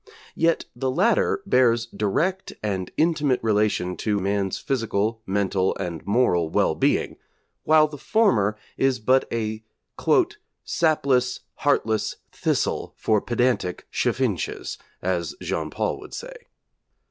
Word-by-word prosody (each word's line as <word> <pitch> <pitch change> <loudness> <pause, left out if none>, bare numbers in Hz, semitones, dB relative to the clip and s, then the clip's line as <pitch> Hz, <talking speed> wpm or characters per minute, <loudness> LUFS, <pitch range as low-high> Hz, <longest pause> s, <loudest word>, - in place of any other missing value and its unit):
Yet 165 0 +1
the 130 - -1
latter 195 - +2
bears 120 -9 +3
direct 155 - -1
and 95 -3 -2
intimate 150 -5 +2
relation 105 -4 +1
to 105 -2 0
man's 100 0 -1
physical, 115 -3 -1
mental, 95 -1 +1
and 90 -4 -4
moral 100 -7 +2
well - - +2
being, - - 0 0.5
while 155 0 +6
the 150 -2 -10
former 125 - +2 0.2
is 135 -1 +2
but 130 +3 +2
a 110 -1 -2 1.0
'sapless, 135 -6 +1
heartless 110 -6 0 0.2
thistle - - -1
for 110 -2 +2
pedantic 120 -7 0
chaffinches,' - - -1 0.2
as 90 -2 -1
Jean - - -3
Paul - - -2
would - - -10
say. - - -7
115 Hz, 115 wpm, -24 LUFS, 100-140 Hz, 1.0 s, while